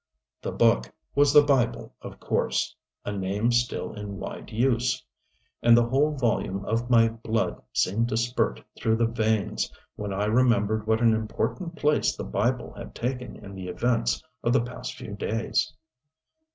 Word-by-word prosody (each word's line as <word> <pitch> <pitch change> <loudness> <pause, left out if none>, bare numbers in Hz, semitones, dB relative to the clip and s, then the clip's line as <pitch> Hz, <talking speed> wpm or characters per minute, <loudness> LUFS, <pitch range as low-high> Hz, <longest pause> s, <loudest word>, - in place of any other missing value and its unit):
The - - -3
"Book" - - +3 0.2
was 145 0 +4
the 150 0 +8
Bible 135 -5 +1
of - - -9
course - - 0 0.3
a - - -2
name 100 +4 0
still 120 +1 0
in 105 -2 -6
wide 95 - -7
use. 120 +1 +1 0.6
And 120 0 +7
the 120 - +4
whole 145 +5 +2
volume 105 -5 0
of 115 +2 -1
my 115 -2 +6
blood 115 0 -2
seemed 115 +5 +1
to 110 - 0
spurt 120 - 0
through 110 0 +1
the 115 +1 +2
veins 110 -3 0 0.3
when 105 -1 -4
I 100 +2 0
remembered 110 -2 +2
what 110 +1 +2
an 115 -1 +5
important 165 - -2
place 150 0 +2
the - - -5
Bible 120 +4 -1
had - - -10
taken 125 0 -3
in 100 - -9
the 95 -1 -7
events 75 - 0 0.2
of 120 - +2
the 135 - +4
past 125 +1 -6
few 105 - -8
days! 110 +2 -1
115 Hz, 165 wpm, -26 LUFS, 105-125 Hz, 0.6 s, the